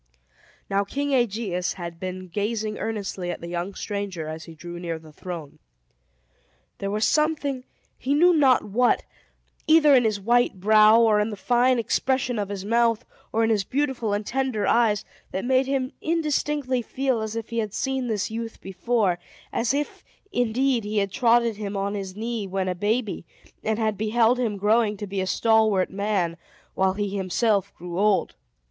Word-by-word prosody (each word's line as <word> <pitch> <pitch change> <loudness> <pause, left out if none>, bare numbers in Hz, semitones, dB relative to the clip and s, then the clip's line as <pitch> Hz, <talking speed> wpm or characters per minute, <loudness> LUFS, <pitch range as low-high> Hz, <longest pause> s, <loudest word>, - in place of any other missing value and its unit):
Now 200 0 +1
King 280 +7 -2
Aegeus 210 -7 0
had 170 -2 -7
been 185 0 -5
gazing 210 +3 -2
earnestly 200 -5 -3
at - - -4
the 170 - -8
young 175 +3 -4
stranger, 200 -6 -4
as 160 +1 -6
he 165 - -11
drew 175 +2 -8
near 170 -2 -3
the 155 -1 -15
throne. 165 -4 -8 1.2
There 195 - -2
was 210 +2 +1
something, 295 -4 0 0.3
he 275 +3 0
knew 350 +4 +6
not 270 -6 +4
what, 240 +4 +2 0.6
either 310 -2 +6
in 250 -2 +6
his 215 -2 +1
white 240 -1 +2
brow, 215 +3 +6
or 220 -2 +4
in 210 +1 +1
the 210 - -5
fine 245 +4 +2
expression 250 +1 0
of 200 -1 -2
his 200 -1 -5
mouth, 230 0 +2 0.3
or 225 - +1
in 225 - +2
his 210 -3 +2
beautiful 260 -2 -1
and 205 +1 -1
tender 260 -5 -1
eyes, 220 -2 +2 0.2
that 190 - -4
made 260 +1 +2
him 265 -1 -1
indistinctly 295 -5 0
feel 260 0 -1
as 220 0 -4
if 225 -1 -5
he 230 0 -2
had 215 -2 -2
seen 265 -1 -1
this 215 -2 -1
youth 225 0 -5
before; 195 -1 0 0.3
as 235 0 +1
if, 290 +2 -3 0.3
indeed, 245 - +1
he 210 +1 -3
had 200 -1 +1
trotted 235 -2 +3
him 205 -1 -4
on 200 +1 -1
his 195 -2 -5
knee 225 -1 -3
when 190 0 -2
a 185 - 0
baby, 205 +1 -1 0.4
and 220 0 0
had 215 -3 -1
beheld 225 +3 +3
him 220 -5 -1
growing 210 +1 +2
to 205 - -5
be 195 -1 -3
a 190 - -2
stalwart 220 -3 +3
man, 195 -4 -1 0.4
while 190 0 +2
he 205 0 -2
himself 200 +1 +1
grew 175 +1 -6
old. 205 -1 +2
215 Hz, 180 wpm, -25 LUFS, 195-245 Hz, 1.2 s, knew